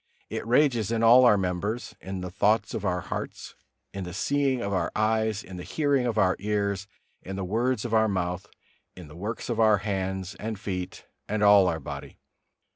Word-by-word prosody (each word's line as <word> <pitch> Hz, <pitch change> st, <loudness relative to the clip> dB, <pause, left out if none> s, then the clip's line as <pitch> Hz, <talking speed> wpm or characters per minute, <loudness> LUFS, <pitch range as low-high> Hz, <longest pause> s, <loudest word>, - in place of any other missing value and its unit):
It -, -, -4 dB
rages 120 Hz, -4 st, +3 dB
in 115 Hz, 0 st, 0 dB
all 125 Hz, +3 st, +8 dB
our 105 Hz, -4 st, +6 dB
members: 95 Hz, +5 st, -2 dB
in 95 Hz, 0 st, -5 dB
the 90 Hz, -1 st, -5 dB
thoughts 105 Hz, +4 st, +1 dB
of 105 Hz, -, -3 dB
our 90 Hz, -2 st, 0 dB
hearts, -, -, -6 dB, 0.4 s
in 95 Hz, 0 st, -4 dB
the 90 Hz, 0 st, -7 dB
seeing 140 Hz, +3 st, +1 dB
of 100 Hz, -4 st, -2 dB
our 95 Hz, -, 0 dB
eyes, 110 Hz, -1 st, +1 dB
in 95 Hz, -1 st, -9 dB
the 90 Hz, -, -6 dB
hearing 140 Hz, -, +1 dB
of 115 Hz, -2 st, -2 dB
our 95 Hz, -3 st, +3 dB
ears, 100 Hz, -1 st, -1 dB, 0.3 s
in 95 Hz, -, -7 dB
the 95 Hz, -1 st, -3 dB
words 115 Hz, +4 st, 0 dB
of 115 Hz, -, -3 dB
our 110 Hz, 0 st, +4 dB
mouth, 90 Hz, 0 st, -2 dB, 0.5 s
in 90 Hz, -3 st, -10 dB
the 75 Hz, -, -12 dB
works 105 Hz, +7 st, -5 dB
of 115 Hz, -2 st, -2 dB
our 110 Hz, -2 st, +5 dB
hands 95 Hz, -1 st, -3 dB
and 110 Hz, -2 st, -4 dB
feet 90 Hz, -3 st, -5 dB, 0.2 s
and 105 Hz, 0 st, 0 dB
all 100 Hz, -2 st, +7 dB
our 80 Hz, -, -1 dB
body. -, -, -8 dB
105 Hz, 200 wpm, -27 LUFS, 95-115 Hz, 0.5 s, all